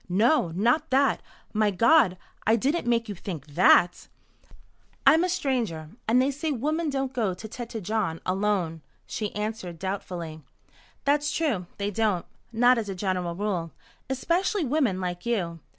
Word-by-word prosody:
"No, 210 - +3
not 240 - +2
that. 275 +2 +3 0.3
My 215 -1 +3
God, 210 - +4 0.3
I 220 - +6
didn't 275 +5 0
make 235 -1 +2
you 205 - -4
think 170 -6 -6
that?" 175 +3 +4 1.0
"I'm 320 +2 +6
a 365 - +1
stranger 235 - -1 0.2
and 235 +3 +4
they 265 +2 +3
say 300 +3 -3
women 305 +5 -1
don't 270 -1 -2
go 215 -8 0
to 220 - -8
Tête 230 0 -6
Jaune 190 -5 -1
alone," 185 -4 0 0.2
she 210 -2 -4
answered 210 -5 -4
doubtfully. 175 -4 -5 0.6
"That's 290 +1 +2
true, 240 - -1
they 200 0 -2
don't 205 -4 0 0.3
not 245 +2 +4
as 210 -3 -4
a 195 - -3
general 180 -2 -2
rule. 180 -4 -2 0.4
Especially 340 +7 0
women 260 -9 +1
like 180 -1 -4
you. 175 -8 -1
215 Hz, 150 wpm, -26 LUFS, 180-265 Hz, 1.0 s, I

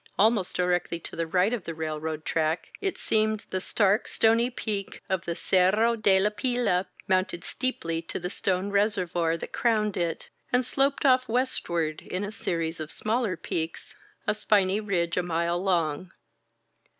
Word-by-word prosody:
Almost 210 -2 +3
directly 180 -1 0
to - - -9
the 165 -1 -2
right 185 +6 +2
of 230 -6 -2
the 165 - -5
railroad 155 0 -4
track, 160 +1 0
it 390 -2 -1
seemed, 215 -1 0
the 185 - -1
stark, 205 +2 +2
stony 230 +2 +3
peak 210 -5 -4
of 190 -1 -1
the 170 - -2
Cerro 200 +7 +3
de 200 -4 +4
la 210 +2 +2
Pila 235 -6 0 0.2
mounted 185 -2 +1
steeply 165 -11 -2
to 165 - -5
the 180 +1 -4
stone 190 +1 -1
reservoir 180 -5 +1
that - - -8
crowned 215 -4 +1
it, 170 -2 -2 0.2
and 250 0 +3
sloped 275 +3 +1
off 255 -2 +4
westward 170 -10 0
in 185 +2 -4
a 205 - -4
series 165 -5 -2
of 155 0 -5
smaller 220 -4 0
peaks, 160 0 -4 0.3
a - - +2
spiny 205 -2 +2
ridge 180 -5 -1
a - - +4
mile 170 0 0
long. 175 -2 0
190 Hz, 160 wpm, -27 LUFS, 170-215 Hz, 0.3 s, de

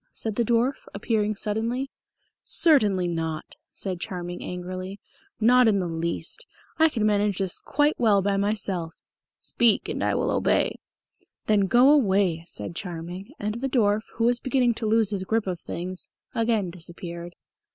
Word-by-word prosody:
said 220 -2 -3
the 235 - +2
dwarf, 240 +4 0
appearing 215 0 0
suddenly. 230 +6 -2 0.5
"Certainly 210 - +3
not," 160 -2 -3 0.2
said 185 -3 -3
Charming 180 -3 -5
angrily. 185 +2 -6 0.4
"Not 245 +2 +5
in 210 -2 +4
the 185 -2 -1
least. 165 0 -3 0.3
I 320 0 +6
can 225 -7 -1
manage 205 -2 +2
this 190 -3 -2
quite 295 +2 +1
well 205 -5 +4
by 200 0 +1
myself." 195 -5 -1 0.4
"Speak, 235 -3 +2
and - - -3
I - - +1
will - - 0
obey." - - +1 0.7
"Then 205 -2 +3
go 250 +6 +6
away," 195 - +3
said 105 +2 -6
Charming; 180 +1 -6
and 215 +3 -3
the 270 - -1
dwarf, 215 -4 +2
who 230 - -1
was 240 +1 +3
beginning 255 -2 +2
to 220 -1 -3
lose 220 -1 +3
his 195 -2 -2
grip 220 +3 0
of 180 -3 -3
things, 180 +3 -6 0.2
again 225 -5 +1
disappeared. 170 0 -7
205 Hz, 155 wpm, -25 LUFS, 180-230 Hz, 0.7 s, I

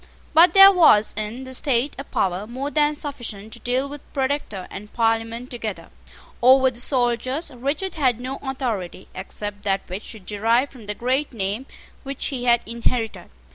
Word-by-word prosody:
But 340 +5 +6
there 390 0 +11
was 310 - +5
in 215 +5 -4
the 260 0 -8
state 260 +1 +1
a - - -4
power 190 -5 -1
more 265 +5 -4
than 300 0 +2
sufficient 230 -8 -6
to 235 - -7
deal 250 +4 -1
with 290 0 -9
Protector 265 -8 -2
and 210 +1 -9
Parliament 225 +1 -1
together. 225 -5 -5 0.5
Over 260 +1 +6
the 240 - -11
soldiers 255 +4 0
Richard 285 +9 -3
had 255 -7 +1
no 260 +2 -5
authority 240 -10 -4
except 205 +2 -6
that 195 -1 0
which 185 +3 -7
he - - -8
derived 225 +7 0
from 235 -6 -13
the 210 - -2
great 260 +5 -1
name 210 +4 -3 0.3
which 275 0 -5
he 250 -3 -4
had 240 -1 +4
inherited. 230 0 -2
245 Hz, 170 wpm, -23 LUFS, 215-275 Hz, 0.5 s, there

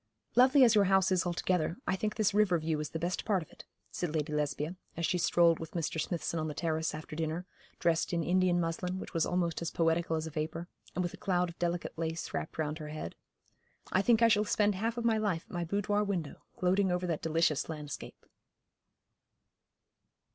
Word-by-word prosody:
'Lovely 260 +3 +7
as 235 -2 +6
your 205 -2 +5
house 190 0 +3
is 185 -1 +2
altogether, 175 -1 0
I - - +1
think 210 +2 -2
this 215 -3 +2
river 205 -4 +4
view 160 -1 -1
is 150 - -3
the - - -4
best 175 +3 -2
part 195 -5 +1
of - - -20
it,' - - -14 0.3
said 175 -3 -3
Lady 150 0 -1
Lesbia, 150 +3 -1 0.2
as 170 - 0
she 180 - +1
strolled 170 -1 +4
with 165 -1 -7
Mr. 160 -1 -1
Smithson 170 0 -2
on 155 - -2
the 150 - -5
terrace 160 -2 -1
after 155 0 -8
dinner, 160 +2 -2 0.3
dressed 165 -1 +1
in 170 -1 0
Indian 180 +1 +3
muslin 175 +2 -2
which 190 - -7
was 165 -2 +1
almost 175 -2 0
as 170 - -2
poetical 165 0 +1
as 160 0 -2
a 160 - -6
vapour, 155 +3 -3 0.3
and 180 - 0
with 175 - -3
a - - -9
cloud 180 -2 0
of 170 - -12
delicate 175 0 -1
lace 165 0 -3
wrapped - - -4
round 155 0 -2
her 155 - -6
head. 150 - -5 0.8
'I 190 - +3
think 230 +2 +4
I - - +8
shall 210 -2 +4
spend 210 0 +2
half 225 +5 -2
of 235 - -2
my 225 -2 +3
life 195 -6 0
at - - -15
my 175 -1 -1
boudoir 205 +4 0
window, 185 -7 -3 0.2
gloating 185 +1 +2
over 180 0 0
that 165 -3 -2
delicious 160 -2 +1
landscape.' 150 -2 -7
175 Hz, 210 wpm, -31 LUFS, 160-190 Hz, 0.8 s, I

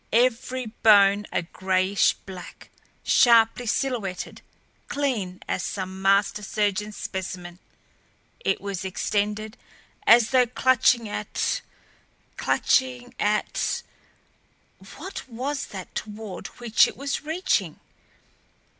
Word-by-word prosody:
Every 250 +2 +1
bone 205 -2 +4
a - - 0
grayish 190 +3 +1
black, 185 -3 -10 0.3
sharply 235 0 +4
silhouetted, 220 -7 -2 0.5
clean 230 -11 -2
as - - -1
some 190 0 -5
master 195 +2 +3
surgeon's 210 0 -1
specimen, 180 -2 -6 0.8
it - - 0
was 200 -2 -4
extended 210 +4 -2 0.5
as 235 -1 +6
though 255 -2 +4
clutching 250 -1 +3
at 210 - -2 0.7
clutching 250 -2 +1
at 210 +1 0 1.1
what 380 -8 -8
was 270 +4 -3
that 190 -3 -9
toward 215 -2 -6
which 235 -2 +4
it - - -8
was 280 +1 -2
reaching? 335 +5 -1
215 Hz, 95 wpm, -25 LUFS, 195-250 Hz, 1.1 s, as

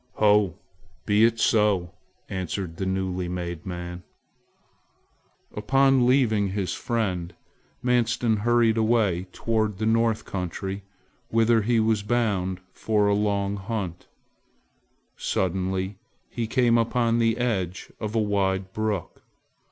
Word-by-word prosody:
"Ho! 105 -4 +3 0.5
Be 105 +2 +4
it 115 0 +1
so!" 105 -6 +2 0.4
answered 95 -2 -4
the 95 - -2
newly 95 -1 -2
made 85 -1 -5
man. 90 0 -6 1.5
Upon 135 +3 +3
leaving 115 -6 +3
his 95 -1 -2
friend, 90 -7 -2 0.5
Manstin 120 -2 +2
hurried 115 +1 +3
away 110 -5 +2
toward 110 -2 -1
the 110 - -2
North 115 0 +2
country 95 +1 -4 0.5
whither 115 0 +3
he 115 +2 +2
was 110 -1 +2
bound 100 -5 0
for 105 -2 +1
a 100 - +3
long 100 -1 0
hunt. 95 -4 -5 1.1
Suddenly 95 +1 -1 0.3
he 115 -2 -3
came 120 -1 +3
upon 115 0 +1
the 115 -1 +2
edge 95 -7 -2
of 110 0 -4
a - - +3
wide 95 -2 0
brook. 110 -5 -3
105 Hz, 115 wpm, -25 LUFS, 95-115 Hz, 1.5 s, Be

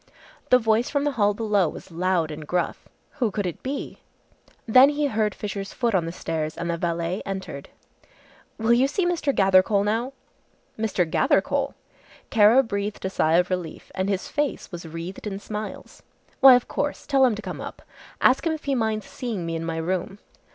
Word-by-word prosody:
The 250 - +7
voice 225 0 +1
from 285 -1 0
the 290 - +1
hall 205 -5 +2
below 205 -6 +1
was - - -11
loud 170 -1 0
and 150 0 -8
gruff. 175 0 -2 0.3
Who 240 -4 +2
could 205 -1 -3
it 175 - -4
be! 275 +2 -5 0.7
Then 255 +3 +7
he 295 0 0
heard 215 -6 0
Fisher's 200 -1 -5
foot 235 -2 0
on 180 -4 +2
the - - -3
stairs 155 -2 -4
and 170 0 -2
the - - -1
valet 170 +2 -2
entered. 190 -8 -6 0.9
"Will 225 +1 +3
you 250 +3 +4
see 350 +6 -1
Mr. 340 -5 +1
Gathercole 195 -1 +4
now!" 230 +5 -1 0.6
"Mr. 210 -5 0
Gathercole!" 205 - +1 0.6
Kara 225 +4 +6
breathed 200 -3 -4
a 190 - -2
sigh 160 -3 +2
of 180 +1 +2
relief 180 -3 -4
and 190 +1 -1
his 195 -2 -1
face 295 -1 -2
was 175 -2 -7
wreathed 165 +6 -7
in 195 -2 -4
smiles. 210 +1 -7 0.4
"Why, 265 -1 +9
of 245 - 0
course. 290 0 -3
Tell 275 -2 +3
him 245 -4 +4
to 215 - -7
come - - -6
up. - - -8 0.4
Ask 265 +6 +4
him 320 - +1
if 315 - -6
he 280 - 0
minds 220 -4 -1
seeing 230 -9 -5
me 165 0 -3
in 165 - -3
my 165 0 -3
room." 185 +4 -2
205 Hz, 190 wpm, -24 LUFS, 180-250 Hz, 0.9 s, Why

